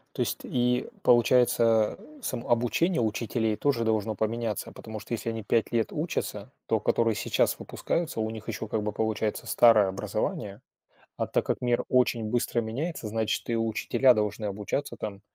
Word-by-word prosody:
То 130 - -2
есть 120 - -1
и 125 -1 0 0.2
получается, 120 -2 +4 0.2
сам 120 - -4
обучение 120 - +2
учителей 110 0 0
тоже 125 -1 +1
должно 110 -1 0
поменяться. 110 0 -2
Потому 110 -1 -8
что 110 +3 -7
если 115 0 -2
они 115 -1 -4
5 115 +1 +1
лет 115 -4 0
учатся, - - -3 0.2
то, - - +2
которые 115 -2 +1
сейчас - - +1
выпускаются, 165 -8 -3
у 110 0 0
них 110 -1 -8
ещё 110 -1 -4
как 110 0 -1
бы 105 - -1
получается 110 0 -2
старое 110 -4 +6
образование, 100 +1 -3 0.6
а - - -1
так - - 0
как - - -1
мир 120 -1 +1
очень 125 -3 +2
быстро 120 +1 0
меняется, 125 +4 -4
значит, 110 0 -1
и 115 - +1
учителя 115 +3 +3
должны 105 0 -1
обучаться 105 +8 -3
там. 100 -2 -6
115 Hz, 165 wpm, -27 LUFS, 105-120 Hz, 0.6 s, старое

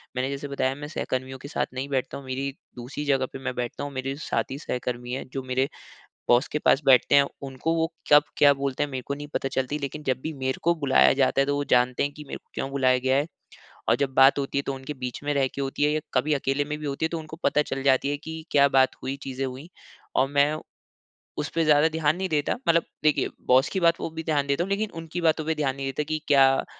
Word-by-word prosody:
मैंने 130 +1 -1
जैसे 140 +1 -4
बताया 135 -1 -1
मैं 145 +1 -7
सहकर्मियों 130 -3 -3
के 140 - -9
साथ 145 - -1
नहीं 130 +2 -4
बैठता 135 -2 -2
हूँ 140 - -10
मेरी 135 +1 -3 0.2
दूसरी 125 +4 -6
जगह 135 -2 +2
पे 135 - -6
मैं 135 -1 -3
बैठता 120 +3 -4
हूँ। 145 - -4
मेरे 135 +1 -3
साथ 150 - -1
ही 135 - -4
सहकर्मी 125 -3 -4
है 130 - -3
जो 135 -1 -3
मेरे 130 +1 0 0.6
बॉस 120 +2 +4
के 150 - -2
पास 140 - +3
बैठते 135 0 +5
हैं 140 0 +7 0.2
उनको 135 +5 -2
वो 165 0 0 0.2
कब 145 - +9
क्या 145 -1 +7
बोलते 140 0 -2
है 145 - 0
मेरे 130 -1 -4
को 140 - -2
नहीं 145 +1 -7
पता 135 - 0
चलती। 135 +2 -2
लेकिन 145 +1 -5
जब 130 -2 0
भी 160 - -4
मेरे 130 -1 -2
को 170 +1 +3
बुलाया 140 -5 +4
जाता 135 0 +2
है 135 - +3
तो 145 - +1
वो 145 - -1
जानते 125 0 +3
है 140 - +1
कि 150 +1 -11
मेरे - - -5
को - - -45
क्यों 135 - -3
बुलाया 130 -2 +3
गया 130 +1 +1
है। 145 +2 +1 0.6
और 115 - +5
जब 135 0 -1
बात 135 +2 +6
होती 140 0 -1
है 140 - 0
तो - - -1
उनके 135 +2 -7
बीच 125 -1 -6
में 145 - 0
रह 140 -1 +2
के - - -4
होती 135 +1 -3
है 150 - +4
या 155 - 0
कभी 155 0 +2
अकेले 140 +1 0
में 150 +1 -4
भी 150 - -6
होती 140 +2 -2
है - - +2
तो 165 0 -3
उनको 155 0 -9
पता 150 - +3
चल 135 -2 -4
जाती 135 0 +3
है 145 - 0
कि 160 +2 -8
क्या 140 -1 +5
बात 135 -1 +3
हुई, 135 +1 -3
चीज़े 135 -1 -5
हुई। 130 +5 -6 0.5
और 130 +1 +3
मैं 145 +2 +3 0.8
उसपे 165 +2 -1
ज़्यादा 150 0 +5
ध्यान 160 -1 +1
नहीं 190 +1 -2
देता। 150 -3 0
मतलब 170 0 +5 0.2
देखिए 155 -1 +3 0.2
बॉस 130 +4 +5
की 190 - -1
बात 170 -1 +4
को - - -4
भी 160 0 -6
ध्यान 145 -3 +1
देता 140 +5 +1
हूँ 195 - -7
लेकिन 205 +2 0
उनकी 165 +2 -5
बातों 160 -2 +2
पे 160 +1 0
ध्यान 140 -4 -1
नहीं 135 0 -4
देता 135 +2 -2
कि 155 0 -1
क्या 135 -1 +5
140 Hz, 260 wpm, -25 LUFS, 130-150 Hz, 0.8 s, कब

